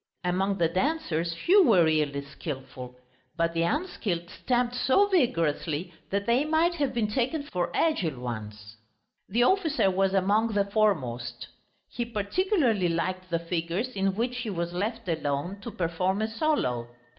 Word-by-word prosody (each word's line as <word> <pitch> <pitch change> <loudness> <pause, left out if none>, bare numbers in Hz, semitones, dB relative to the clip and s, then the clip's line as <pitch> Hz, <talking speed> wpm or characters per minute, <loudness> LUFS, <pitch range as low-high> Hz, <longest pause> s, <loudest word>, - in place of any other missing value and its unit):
Among 190 +2 0
the 170 - +3
dancers 175 - -1
few 370 - +5
were 205 - +5
really 150 -3 +1
skilful, 130 -3 -7 0.4
but 165 0 +1
the 165 - 0
unskilled 185 - -2
stamped 245 -1 0
so 260 +10 +3
vigorously 170 - 0 0.2
that 200 +1 -1
they 240 +4 +3
might 320 +3 +2
have 290 -5 -1
been 230 -3 0
taken 260 +7 -1
for 180 -11 -2
agile 180 - +1
ones. 110 -3 -7 0.5
The 235 +5 +3
officer 315 - +3
was 195 +1 +1
among 210 +4 +2
the 200 -1 +2
foremost; 130 - -1 0.4
he 240 - -3
particularly 235 - +1
liked 185 +2 -2
the 170 - +1
figures 170 +6 -2
in 195 -5 -1
which 245 +3 -1
he 230 -2 -3
was 170 -3 -3
left 220 +4 -3
alone, 160 +3 -2
to 235 - -6
perform 185 0 -1
a - - +1
solo. 220 - 0
195 Hz, 150 wpm, -27 LUFS, 165-240 Hz, 0.5 s, few